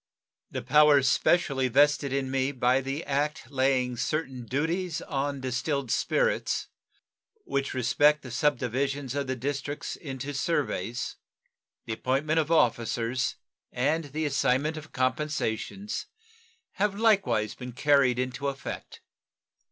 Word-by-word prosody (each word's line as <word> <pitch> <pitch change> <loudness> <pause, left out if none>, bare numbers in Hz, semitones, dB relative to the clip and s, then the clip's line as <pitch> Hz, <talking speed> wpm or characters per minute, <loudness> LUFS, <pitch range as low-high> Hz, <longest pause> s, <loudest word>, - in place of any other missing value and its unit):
The - - -5
powers 150 -3 +5
specially 135 -3 +2
vested 145 +2 +3
in 135 -1 -1
me 135 +1 +1
by 130 0 +2
the 135 +4 -4
act 145 -1 -2
laying 130 -2 +1
certain 130 -2 -2
duties 165 - -1
on 140 -1 -2
distilled 130 0 -2
spirits, - - 0 0.7
which 140 - -2
respect 145 +4 +3
the 130 - -8
subdivisions 135 0 0
of 140 -1 -2
the 130 - -1
districts 140 +3 -4
into 135 -1 -6
surveys, 135 - -2 0.7
the 110 - -3
appointment 140 +7 0
of 155 -1 0
officers, 120 -3 +1 0.4
and 155 +6 0
the 155 +3 -3
assignment 140 +2 +1
of 155 0 -9
compensations, 150 - -2 0.6
have 200 0 0
likewise 195 - +2
been 125 0 -8
carried 135 -2 +3
into 130 +2 -2
effect. 135 -1 -6
140 Hz, 120 wpm, -28 LUFS, 130-150 Hz, 0.7 s, powers